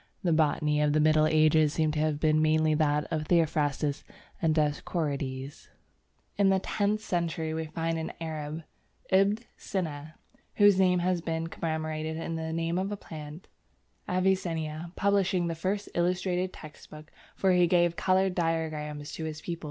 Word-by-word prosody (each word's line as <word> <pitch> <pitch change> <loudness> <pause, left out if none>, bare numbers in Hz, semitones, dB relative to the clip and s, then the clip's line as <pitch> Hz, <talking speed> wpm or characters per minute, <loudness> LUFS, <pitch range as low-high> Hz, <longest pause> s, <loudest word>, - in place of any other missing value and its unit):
The 175 -3 +2
botany 150 -1 +2
of 150 -1 +2
the 155 - +3
Middle 155 0 +4
Ages 155 -1 +4
seems 155 -2 +1
to 155 - -1
have 155 -1 0
been 155 0 +3
mainly 155 0 +3
that 150 -1 +1
of 155 -2 -2
Theophrastus 150 -3 +1 0.4
and 160 -3 +2
Dioscorides. 145 -3 -2 0.7
In 200 -1 +4
the 190 - +4
tenth 205 +2 -1
century 165 -5 -2
we 160 0 -2
find 165 +1 -2
an 160 - -4
Arab, 155 -1 -5 0.5
Ibn 195 +2 +4 0.2
Sina, 155 -4 -4 0.4
whose 205 -2 +5
name 180 -1 +4
has 180 0 0
been 165 -1 -2
commemorated 160 -1 -3
in 165 0 -4
the 160 0 -4
name 165 +2 -1
of 195 +2 -2
a 205 - -3
plant, 155 -2 -9 0.6
Avicennia, 170 -3 -1
publishing 195 -3 +2
the 170 - -1
first 190 +5 -2
illustrated 180 +1 0
text 155 -3 -13
book, 155 +1 -12 0.2
for 190 - +2
he 180 -1 +4
gave 175 -1 +3
coloured 190 +1 +2
diagrams 155 -3 -2
to 160 - -5
his 155 -1 -5
pupils. 170 -1 -5
160 Hz, 160 wpm, -28 LUFS, 155-180 Hz, 0.7 s, whose